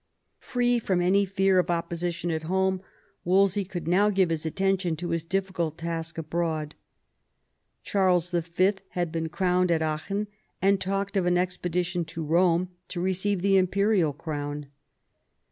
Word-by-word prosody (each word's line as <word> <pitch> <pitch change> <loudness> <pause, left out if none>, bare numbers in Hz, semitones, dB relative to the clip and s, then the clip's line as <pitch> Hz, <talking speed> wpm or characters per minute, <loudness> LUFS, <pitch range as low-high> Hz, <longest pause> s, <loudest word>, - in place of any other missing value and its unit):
Free 245 -1 +1
from 190 -5 0
any 190 +3 +3
fear 195 -1 +3
of 180 - 0
opposition 170 0 -2
at 160 0 -3
home, 190 0 +1 0.4
Wolsey 195 +2 +3
could 180 -3 -6
now 195 +4 +4
give 190 -4 +2
his 160 0 -1
attention 190 0 0
to 175 +2 -5
his 165 0 0
difficult 175 -3 -2
task 165 -1 -4
abroad. 160 -1 -2 1.1
Charles 180 -3 +2
Y. 175 +3 +2 0.2
had 175 -2 0
been 165 -1 -2
crowned 180 +1 +1
at 165 -2 +2
Aachen, 160 +7 -2 0.3
and 195 +1 +3
talked 195 +2 -2
of 185 -3 +2
an 175 0 +3
expedition 180 0 -1
to 160 0 -6
Eome 175 +2 +3 0.2
to 175 - -5
receive 190 +1 0
the 195 -1 +4
imperial 190 -2 +2
crown. 145 -1 -5
180 Hz, 145 wpm, -27 LUFS, 165-190 Hz, 1.1 s, now